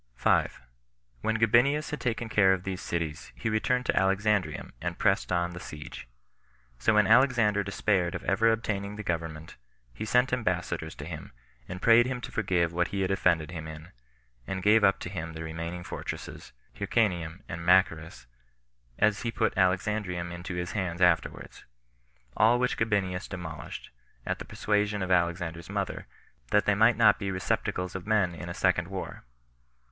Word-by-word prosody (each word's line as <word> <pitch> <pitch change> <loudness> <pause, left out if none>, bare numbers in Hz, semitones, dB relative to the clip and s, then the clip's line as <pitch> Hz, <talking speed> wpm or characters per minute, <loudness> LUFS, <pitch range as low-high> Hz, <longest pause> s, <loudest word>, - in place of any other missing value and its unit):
5. - - +1 0.6
When 110 - 0
Gabinius 120 +8 +3
had 150 - -4
taken 120 -1 -2
care 100 -3 +4
of 90 -1 -3
these 95 -1 -4
cities, 80 -3 -4
he 110 - -2
returned 125 +3 +1
to - - +1
Alexandrium, 100 +1 +1
and - - -3
pressed - - +1
on 85 0 +1
the 90 - -8
siege. 75 -6 -9 0.7
So 110 - +2
when 105 -1 +5
Alexander 115 -4 +4
despaired 100 -3 0
of - - -5
ever 115 +4 +3
obtaining 105 -2 -2
the 105 - -6
government, 80 -3 -4 0.4
he - - -6
sent 125 +3 +2
ambassadors 90 -7 -2
to - - -8
him, - - -8 0.4
and 90 0 -7
prayed 115 +1 +6
him 130 -1 -3
to - - -7
forgive 85 -6 0
what 90 0 +1
he 100 - -3
had 95 0 0
offended 85 -4 +1
him 80 -2 -6
in, 80 +2 -9 0.6
and 95 -1 -4
gave 105 +1 +5
up 95 -1 +5
to - - -5
him 80 -3 -5
the 80 +1 -6
remaining 85 +2 -5
fortresses, - - -7 0.2
Hyrcanium 90 -5 -1
and 85 +1 -6
Machaerus, 85 -5 +2 0.7
as 105 -1 +2
he 115 - -2
put 115 -1 0
Alexandrium 90 -2 0
into 85 +1 -6
his 90 0 -3
hands 90 -4 -3
afterwards; 90 -2 0 0.7
all 115 +4 +5
which 125 0 0
Gabinius 100 -4 -1
demolished, 80 -5 -7 0.3
at - - -2
the - - -7
persuasion 105 -1 0
of 95 - -3
Alexander's 85 -1 0
mother, - - -3 0.4
that 105 0 +3
they 105 - +3
might 110 +3 +4
not 105 -3 +5
be 100 -1 -3
receptacles 90 -1 -2
of 95 +1 -6
men 105 -5 +2
in 85 +1 -7
a - - -4
second - - +1
war. - - -7
95 Hz, 170 wpm, -28 LUFS, 85-110 Hz, 0.7 s, prayed